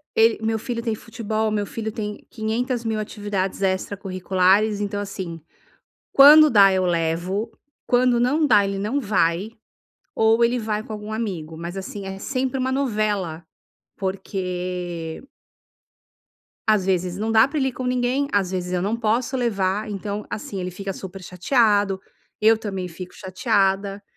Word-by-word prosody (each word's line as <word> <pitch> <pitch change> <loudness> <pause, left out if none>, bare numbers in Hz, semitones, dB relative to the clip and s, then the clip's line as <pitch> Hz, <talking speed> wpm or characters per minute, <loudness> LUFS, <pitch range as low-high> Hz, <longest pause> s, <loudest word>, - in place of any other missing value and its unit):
ele 225 0 +4
meu 220 0 0
filho 235 +1 -4
tem 230 -2 -1
futebol, 220 -1 -3
meu 210 -1 0
filho 220 +1 -5
tem 210 -2 -6
quinhentas 235 +2 -2
mil 220 -1 -1
atividades 205 -3 -3
extracurriculares, 190 +1 +1
então, 205 0 -2
assim. 190 -5 -6 0.7
Quando 300 +2 +9
dá 200 -5 +7
eu 185 -1 +1
levo. 175 +5 -1 0.3
Quando 245 -1 +3
não 285 +6 +2
dá 210 -7 +5
ele 195 0 -2
não 215 +8 -1
vai. 200 -3 +1 0.6
Ou 225 +1 +4
ele 240 +1 +2
vai 215 -2 -2
com 220 - -9
algum 210 0 -6
amigo, 180 -8 -4
mas, 170 +2 -6
assim, 195 +1 -6
é 195 0 -6
sempre 260 +3 -2
uma 260 0 0
novela. 210 - -1 0.5
Porque 180 -3 -4 1.4
às 215 -3 +4
vezes 185 -1 0
não 220 +2 -1
dá 220 +2 +6
pra 300 +2 -2
ele 265 - +1
ir - - -7
com 255 - -5
ninguém, 250 +2 +1
às 195 -3 +2
vezes 180 -1 -3
eu 180 - 0
não 210 +5 -1
posso 235 +3 0
levar. 210 -3 0
Então, 205 +1 -4
assim, 205 -2 -5
ele 180 0 -4
fica 195 +2 -5
super 190 0 -8
chateado. 205 +1 +2 0.4
Eu 220 +1 +6
também 195 -4 -4
fico 180 +1 -9
chateada. 195 +1 0
205 Hz, 155 wpm, -23 LUFS, 190-225 Hz, 1.4 s, Quando